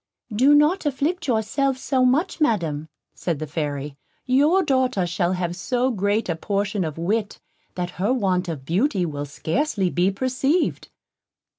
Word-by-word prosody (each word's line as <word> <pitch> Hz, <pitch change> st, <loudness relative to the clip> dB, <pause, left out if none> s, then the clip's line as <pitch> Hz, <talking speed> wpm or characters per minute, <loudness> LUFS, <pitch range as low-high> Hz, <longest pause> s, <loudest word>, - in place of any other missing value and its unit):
"Do 270 Hz, +6 st, +5 dB
not 300 Hz, +3 st, +3 dB
afflict 310 Hz, +5 st, -1 dB
yourself 255 Hz, +4 st, +1 dB
so 260 Hz, -1 st, 0 dB
much, 310 Hz, +7 st, +1 dB
Madam," 160 Hz, -, 0 dB, 0.2 s
said 170 Hz, -4 st, -2 dB
the 155 Hz, -, -4 dB
Fairy; 145 Hz, -2 st, -4 dB, 0.3 s
"your 295 Hz, +9 st, +4 dB
daughter 260 Hz, -, +1 dB
shall 175 Hz, +1 st, 0 dB
have 175 Hz, -1 st, -2 dB
so 250 Hz, +7 st, 0 dB
great 205 Hz, +1 st, 0 dB
a 170 Hz, -, -1 dB
portion 200 Hz, +3 st, -1 dB
of 155 Hz, -2 st, -4 dB
wit, 205 Hz, +5 st, -1 dB, 0.4 s
that 180 Hz, -1 st, -3 dB
her 205 Hz, +5 st, +2 dB
want 190 Hz, -7 st, 0 dB
of 145 Hz, -5 st, -5 dB
beauty 190 Hz, -, +1 dB
will 145 Hz, -3 st, -4 dB
scarcely 190 Hz, -, -1 dB
be 180 Hz, +2 st, +2 dB
perceived." 260 Hz, -, 0 dB
205 Hz, 150 wpm, -23 LUFS, 175-265 Hz, 0.4 s, Do